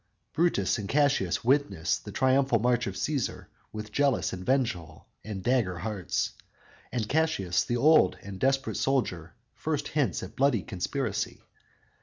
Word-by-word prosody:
"_ - - -49
Brutus 155 - +1
and 100 -2 -5
Cassius 145 -1 +2
witness 120 - +1
the - - -9
triumphal 130 -1 +3
march 120 +1 +1
of 95 - -4
Cæsar 140 +2 -2 0.3
with 110 0 -7
jealous, 140 +1 +1
vengeful 95 -6 -2 0.2
and 100 -3 -6
dagger 115 -8 +1
hearts, 100 0 -2 0.6
and 115 -4 -2
Cassius, 145 - +1
the 120 - -1
old, 150 - +5 0.2
desperate 135 0 +1
soldier, 90 - -1 0.2
first 150 -2 -3
hints 145 -4 0
at - - -9
blood 135 -7 +2
conspiracy. 105 +4 -3
125 Hz, 135 wpm, -28 LUFS, 100-140 Hz, 0.6 s, old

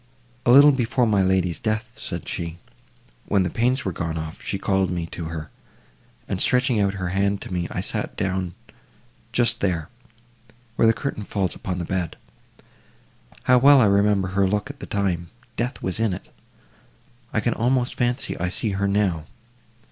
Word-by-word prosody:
"A - - +7
little 140 +3 +9
before 125 -1 +1
my 105 -3 +3
lady's 95 -2 +1
death," 110 +2 -2
said - - -5
she, 85 0 -4 0.7
"when 100 -2 +3
the 90 - -2
pains 125 +3 +1
were 95 - 0
gone 80 -1 -3
off, 80 +2 -6
she 100 - -3
called 95 -2 +1
me 85 -2 -2
to 85 0 -7
her, 80 -1 -6 0.8
and 95 - -2
stretching 125 -2 +3
out 100 -1 +1
her 95 -2 -3
hand 100 +2 +1
to - - -7
me, 90 -1 -1
I - - -3
sat - - -4
down 95 -2 -2 0.8
just 120 0 +2
there—where 115 - -4
the - - +7
curtain 125 -4 -4
falls 100 -3 -1
upon 90 -1 -4
the 90 - -3
bed. 90 -2 -2 1.3
How 125 0 +5
well 140 +2 +7
I 120 - +6
remember 100 -1 +3
her 95 0 +2
look 105 +7 -1
at 145 - -18
the - - -8
time—death 115 +7 -3
was 95 +3 -2
in 110 -5 +1
it!—I 120 +4 -11
can 120 +1 0
almost 125 +1 +1
fancy 125 +1 -1
I 90 +1 0
see 105 +4 -2
her 100 +1 0
now. 100 -6 +1
100 Hz, 170 wpm, -23 LUFS, 90-120 Hz, 1.3 s, little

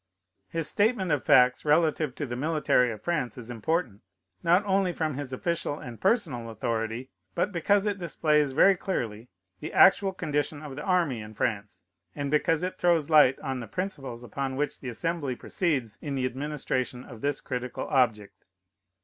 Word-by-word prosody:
His 165 -2 0
statement 205 0 +1
of 145 -2 +1
facts 125 0 +5
relative 155 -2 +2
to 145 - -3
the 120 -2 -5
military 145 -3 +2
of 110 - -9
France 150 -10 -1
is 120 -1 -8
important, 120 - -2 0.4
not 175 +4 +3
only 195 -2 +2
from 155 -2 -1
his 135 -1 -5
official 160 +2 -2
and 120 -6 -9
personal 135 - 0
authority, 115 +2 -3 0.2
but 205 - 0
because 200 +3 +2
it 205 -2 -1
displays 150 -4 +1
very 195 +8 +5
clearly 120 - -4 0.3
the 155 - -6
actual 195 0 +5
condition 150 -3 -2
of 145 -3 -7
the 150 - -6
army 170 - +1
in 105 0 -10
France, 100 -6 -3 0.3
and 140 -1 -3
because 160 +2 +2
it 185 - -4
throws 165 -3 +2
light 150 -4 +6
on 135 -3 -3
the 115 - -7
principles 135 - -5
upon 135 +2 -4
which 145 +2 -2
the 130 - -6
Assembly 145 +1 -2
proceeds 135 - -2
in 145 -2 -4
the 130 -1 0
administration 130 -2 -3
of 115 -4 -12
this 145 -1 0
critical 125 -1 -4
object. 110 -7 0
145 Hz, 170 wpm, -27 LUFS, 125-170 Hz, 0.4 s, light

